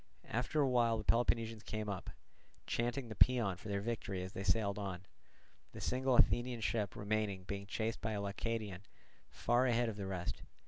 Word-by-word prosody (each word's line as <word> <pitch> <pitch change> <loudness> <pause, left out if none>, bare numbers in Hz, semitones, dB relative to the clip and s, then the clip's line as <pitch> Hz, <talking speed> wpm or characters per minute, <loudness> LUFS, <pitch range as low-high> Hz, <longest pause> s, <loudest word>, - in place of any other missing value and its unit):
After 125 +7 0
a 140 - +4
while 120 -3 +3
the 110 - -4
Peloponnesians 115 -1 +2
came 110 0 -4
up, 100 -3 -4 0.6
chanting 120 +2 -1
the 110 - -7
paean 115 -5 +4
for 95 - -11
their 100 0 0
victory 100 -4 -3
as 95 - -7
they - - -4
sailed 100 +1 +2
on; 95 -2 -4 0.7
the - - -7
single 130 0 +1
Athenian 120 0 +4
ship 110 -2 0
remaining 105 -2 -1
being 100 +1 -5
chased 110 +3 -2
by 110 0 -1
a 105 - -1
Leucadian 100 -1 -3 0.5
far 120 +2 +2
ahead 120 -1 +2
of 105 - -6
the 100 -2 -4
rest. 90 -2 -3
110 Hz, 180 wpm, -36 LUFS, 100-120 Hz, 0.7 s, a